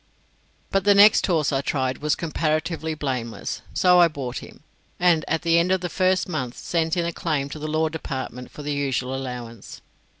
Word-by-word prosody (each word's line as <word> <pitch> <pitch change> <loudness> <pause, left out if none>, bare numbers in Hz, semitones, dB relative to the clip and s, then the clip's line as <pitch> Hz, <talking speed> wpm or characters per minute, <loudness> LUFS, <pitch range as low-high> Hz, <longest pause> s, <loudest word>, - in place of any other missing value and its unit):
But 195 -1 +1
the 205 0 +5
next 205 +1 +6
horse 160 -6 +1
I 135 -1 +1
tried 130 -2 -1
was 150 0 +1
comparatively 160 0 -2
blameless, 125 -6 -4
so 180 -1 +4
I 175 - +7
bought 135 -6 -5
him, - - -13 0.4
and 175 -3 +3
at 160 - -1
the 170 0 +4
end 175 +2 +1
of 190 -1 +2
the 175 - -3
first 185 0 +1
month 130 -8 -4
sent 165 0 -1
in 170 - +1
a 170 - -2
claim 145 -5 -2
to 155 - -7
the 155 - -4
Law 155 +1 +1
Department 130 -5 -6
for 150 - -10
the 145 0 -2
usual 135 -2 -1
allowance. 125 -4 -7
155 Hz, 195 wpm, -23 LUFS, 135-170 Hz, 0.4 s, I